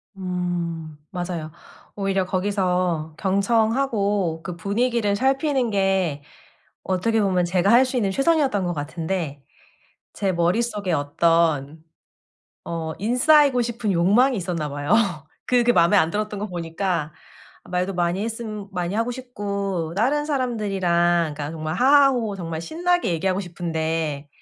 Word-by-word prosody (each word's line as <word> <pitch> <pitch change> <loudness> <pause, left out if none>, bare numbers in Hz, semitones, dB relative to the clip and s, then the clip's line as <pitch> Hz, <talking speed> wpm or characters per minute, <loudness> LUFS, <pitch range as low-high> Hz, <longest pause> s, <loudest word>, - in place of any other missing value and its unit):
음. 175 -4 -3
맞아요. 175 -4 -4 0.4
오히려 195 -2 0
거기서 180 -4 -1
경청하고 205 -3 +1
그 175 - -5
분위기를 210 +3 0
살피는 270 +1 +1
게 190 -7 0 0.6
어떻게 220 +4 0
보면 185 -3 +2
제가 180 +3 +1
할 245 +3 +7
수 255 0 -3
있는 205 -5 +1
최선이었던 275 - +2
것 175 - -1
같은데 160 -1 -4 0.7
제 195 -2 -1
머릿속에 190 +2 0
어떤 155 0 +1 0.8
어 160 -1 -4
인싸이고 250 - +4
싶은 230 -3 -2
욕망이 210 +10 +3
있었나 170 -5 -3
봐요. 145 +3 -5 0.6
그게 245 -1 +3
마음에 170 0 +4
안 165 -4 +3
들었던 210 +2 -3
거 210 - -3
보니까 170 -3 -3 0.5
말도 180 +2 -2
많이 175 +2 0
했음 215 -2 -5
많이 180 0 -2
하고 230 +3 0
싶고 200 -9 -4
다른 275 +8 +1
사람들이랑 190 - +1
그러니까 145 0 -5
정말 155 -1 -4
하하 275 +7 +6
호호 225 -6 -2
정말 165 -3 -5
신나게 350 - 0
얘기하고 185 +3 0
싶은데 160 -4 -3
190 Hz, 290 characters per minute, -23 LUFS, 170-225 Hz, 0.8 s, 할